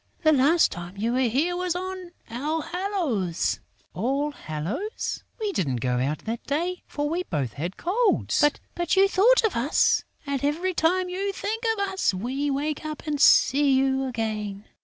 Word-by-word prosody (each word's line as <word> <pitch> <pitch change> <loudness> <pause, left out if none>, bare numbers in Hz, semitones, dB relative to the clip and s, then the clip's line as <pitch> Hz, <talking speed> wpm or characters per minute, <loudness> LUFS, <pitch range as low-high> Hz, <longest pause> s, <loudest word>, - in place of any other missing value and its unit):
The 315 - +6
last 300 +5 +4
time 175 +1 -8
you 230 +4 0
were 255 - +1
here 310 +10 +1
was 360 -1 -1
on 370 0 -5 0.2
All 300 +7 -2
hallows...." 325 - -1 0.3
"All 275 - 0
hallows? 185 - -4 0.2
We 425 -2 -1
didn't 145 - -1
go 125 +1 0
out 140 +4 -2
that 230 +1 -4
day, 345 +6 -1
for 290 0 -2
we 335 +4 -1
both 140 - -3
had 170 +6 -5
colds!" 415 +1 +1 0.3
"But 345 0 0
you 390 +1 +6
thought 450 +7 +4
of 445 - +1
us! 255 +6 +3 0.2
And, 280 -2 -2
every 335 +6 0
time 360 +2 +2
you 385 +2 -2
think 440 +4 -4
of 400 0 0
us, 380 - 0
we 260 +9 -2
wake 290 +2 -2
up 310 0 -6
and 295 -2 -2
see 280 0 +5
you 265 0 +2
again." 215 -4 -3
290 Hz, 170 wpm, -25 LUFS, 225-360 Hz, 0.3 s, The